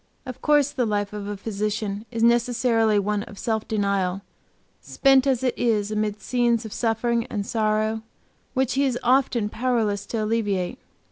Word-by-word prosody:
Of 255 -2 -8
course 295 -2 +3
the 250 -5 -1
life 205 -1 -1
of 205 -1 -5
a 205 0 -4
physician 210 0 -3
is 230 -1 -2
necessarily 235 -2 +3
one 205 +1 0
of 205 -1 -10
self 220 0 -2
denial, 200 -3 0 0.6
spent 270 -1 +3
as 260 -2 +1
it 255 - +1
is 215 -3 0
amid 215 -1 -2
scenes 240 -2 +1
of 220 - -7
suffering 235 +1 0
and 205 -2 -3
sorrow, 215 0 0 0.5
which 260 -1 +1
he 275 +2 +2
is 260 -3 +1
often 250 -4 +2
powerless 220 -3 -1
to 225 -2 -2
alleviate. 210 -1 -1
220 Hz, 160 wpm, -24 LUFS, 210-245 Hz, 0.6 s, course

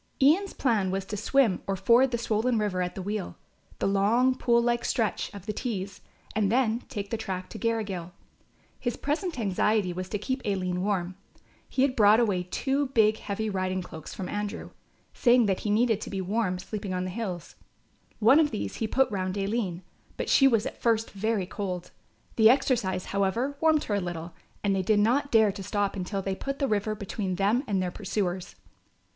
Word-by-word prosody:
Ian's 330 +8 +4
plan 220 -8 +1
was 190 +1 -2
to 205 - -5
swim 220 -1 +2
or 195 - 0
ford 235 +7 +4
the 240 - -1
swollen 230 +1 0
river 205 -4 0
at 180 0 -3
the 190 - -5
Weal, 205 -1 -4 0.4
the - - -2
long 215 +6 +3
pool 240 -2 +2
like 240 0 +1
stretch, 225 -3 -1
of 200 -2 -10
the 210 - -3
Tees, 200 -4 -4 0.3
and 210 -2 +2
then 235 -2 +2
take 205 -6 -5
the 230 - 0
track 185 -3 -5
to - - -7
Garrigill. 205 -7 -2 0.7
His 240 - -2
present 315 +2 -2
anxiety 205 -2 +1
was 185 +1 -5
to 210 - -1
keep 260 +6 -3
Aline 185 -3 -1
warm. 185 -2 -1 0.5
He 260 - +1
had 270 -2 +1
brought 210 0 +6
away 205 -6 +2
two 270 +10 -1
big 220 -4 +3
heavy 210 +2 -3
riding 185 -2 -1
cloaks 160 -3 -9
from 185 - -5
Andrew, 205 0 -4 0.4
saying 245 -1 +4
that 195 -2 +1
he 210 - -3
needed 220 0 +2
to - - -5
be 195 - -3
warm 190 0 -1
sleeping 195 0 -5
on 180 - -1
the 185 - -4
hills. 185 -5 -5 0.6
One 230 +7 +6
of 310 -2 +4
these 215 - -4
he 225 - -1
had 215 - -6
put 265 -3 +3
round 185 -1 -2
Aline, 195 -3 -2 0.3
but - - -3
she 270 - +6
was 230 -5 +2
at - - -6
first 225 -1 +1
very 205 -1 -1
cold. 180 -2 -5 0.5
The 220 -1 +7
exercise, 230 -8 +1
however, 200 +8 0
warmed 315 -2 +4
her 210 - -3
a 200 - +1
little 175 -1 -5 0.3
and 200 -1 +2
they 190 - +1
did 205 +3 +2
not 255 +7 +2
dare 220 -3 +5
to 195 0 -8
stop 205 0 -1
until 195 +1 -3
they 195 - -2
had 190 - -4
put 275 0 -3
the 275 - 0
river 215 -1 0
between 200 -2 -3
them 205 +8 +2
and 200 -2 0
their 180 -1 -1
pursuers. 185 -2 -3
210 Hz, 200 wpm, -27 LUFS, 190-235 Hz, 0.7 s, The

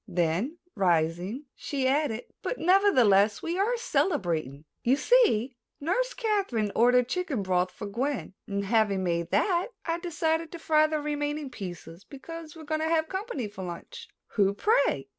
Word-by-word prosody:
Then, 175 - 0 0.2
rising, 180 - 0
she 275 -4 -2
added: 270 -4 +1 0.2
"But, - - -3
nevertheless, 250 - +4
we 345 +3 -2
are 465 +5 +2
celebrating. 165 - -1 0.2
You 250 +3 +3
see, 275 - +3 0.2
Nurse - - 0
Kathryn 395 - 0
ordered 245 +1 +4
chicken 300 - -2
broth 185 -1 +1
for 205 - -8
Gwen 240 +4 -3
and, 200 0 -2
having 205 -2 +2
made 170 -1 -1
that, 360 - +2 0.2
I 335 0 -1
decided 325 -1 -1
to - - -5
fry 310 -2 +3
the 310 0 -1
remaining 295 -1 -3
pieces 175 -4 -8
because 320 +4 -9
we 320 - -10
are - - -12
going 310 +1 -1
to 320 - 0
have 320 -1 +1
company 380 - -3
for 200 -2 -8
lunch." 460 - -8 0.2
"Who, 200 -2 +2
pray?" 280 - +2
275 Hz, 160 wpm, -28 LUFS, 200-330 Hz, 0.2 s, nevertheless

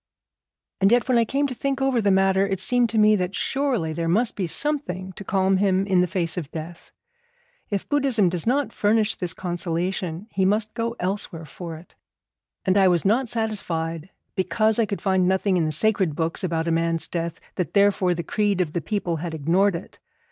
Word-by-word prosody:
And 195 +2 +4
yet 240 +1 +3
when 250 -2 +3
I 230 - +3
came 275 +5 0
to 270 - -2
think 275 +2 -2
over 270 -3 +1
the 205 - +2
matter, 190 0 +3
it 195 -2 -2
seemed 245 +4 +3
to 225 - -2
me 215 0 +5
that 180 +1 -2
surely 260 - -1
there 165 +1 -2
must 215 +8 +1
be 190 -4 -2
something 190 - -2
to 200 - -9
calm 190 0 +1
him 190 -1 +2
in 190 -2 +3
the 180 - +1
face 170 -1 -1
of 155 -6 -4
death. 165 +1 -8 0.8
If 200 -2 -3
Buddhism 270 -9 +2
does 175 +3 -2
not 275 +3 +1
furnish 215 +1 +2
this 180 -3 -4
consolation, 175 0 -3
he 190 - 0
must 210 +3 +1
go 230 0 -2
elsewhere 180 -3 -3
for 165 +2 -8
it. 165 - -16 0.7
And 190 +1 +3
I 190 - +5
was 175 -3 +2
not 230 +5 +2
satisfied, 170 -7 -2 0.2
because 215 +5 +1
I 225 - +2
could 200 - -5
find 190 -2 +2
nothing 190 +1 +1
in 170 -3 +2
the 155 - -1
sacred 190 -1 +1
books 165 +5 -1
about 165 -2 -1
a - - +1
man's 165 0 0
death, 170 -1 -4
that 180 -6 -4
therefore 200 -3 +3
the 170 - -4
creed 205 -1 0
of 165 -4 -1
the 170 - -1
people 180 -5 -2
had 165 0 -5
ignored 175 +6 +2
it. 170 - -9
190 Hz, 205 wpm, -23 LUFS, 170-215 Hz, 0.8 s, me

